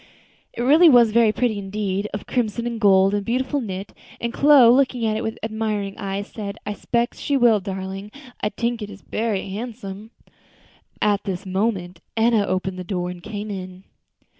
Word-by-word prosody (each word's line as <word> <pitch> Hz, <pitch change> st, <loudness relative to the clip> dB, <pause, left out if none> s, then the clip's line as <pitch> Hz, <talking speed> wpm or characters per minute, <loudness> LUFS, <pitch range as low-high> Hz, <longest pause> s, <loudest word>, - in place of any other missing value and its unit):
It 240 Hz, -, -3 dB
really 315 Hz, +6 st, +7 dB
was 240 Hz, -5 st, +6 dB
very 230 Hz, -1 st, +4 dB
pretty 220 Hz, -2 st, 0 dB
indeed, 200 Hz, 0 st, -2 dB
of 205 Hz, -, -5 dB
crimson 235 Hz, -2 st, -1 dB
and 235 Hz, -1 st, -4 dB
gold, 195 Hz, -1 st, +5 dB
and 205 Hz, -1 st, 0 dB
beautifully 260 Hz, +5 st, -1 dB
knit, 195 Hz, -2 st, -6 dB, 0.3 s
and 235 Hz, 0 st, -3 dB
Chloe, 275 Hz, -5 st, +7 dB
looking 255 Hz, -3 st, +2 dB
at 215 Hz, -1 st, +1 dB
it 220 Hz, -, -2 dB
with 220 Hz, -1 st, -3 dB
admiring 215 Hz, -3 st, -2 dB
eyes, 200 Hz, 0 st, -3 dB
said, 205 Hz, -1 st, -7 dB
"I 210 Hz, -, -2 dB
spec 235 Hz, +4 st, -1 dB
she 285 Hz, -, -1 dB
will, 235 Hz, -4 st, +5 dB
darlin'. 195 Hz, +1 st, -6 dB, 0.3 s
I 210 Hz, -, +1 dB
tink 235 Hz, +2 st, -2 dB
it's 205 Hz, -1 st, -8 dB
berry 215 Hz, -4 st, -2 dB
handsome." 215 Hz, -1 st, -7 dB, 0.9 s
At 205 Hz, -1 st, +1 dB
this 195 Hz, 0 st, -4 dB
moment 190 Hz, -2 st, -2 dB, 0.2 s
Enna 225 Hz, -2 st, +3 dB
opened 185 Hz, 0 st, -2 dB
the -, -, -4 dB
door 180 Hz, -1 st, -3 dB
and 180 Hz, -1 st, -10 dB
came 210 Hz, +2 st, -6 dB
in. 185 Hz, -1 st, -7 dB
210 Hz, 175 wpm, -22 LUFS, 195-235 Hz, 0.9 s, really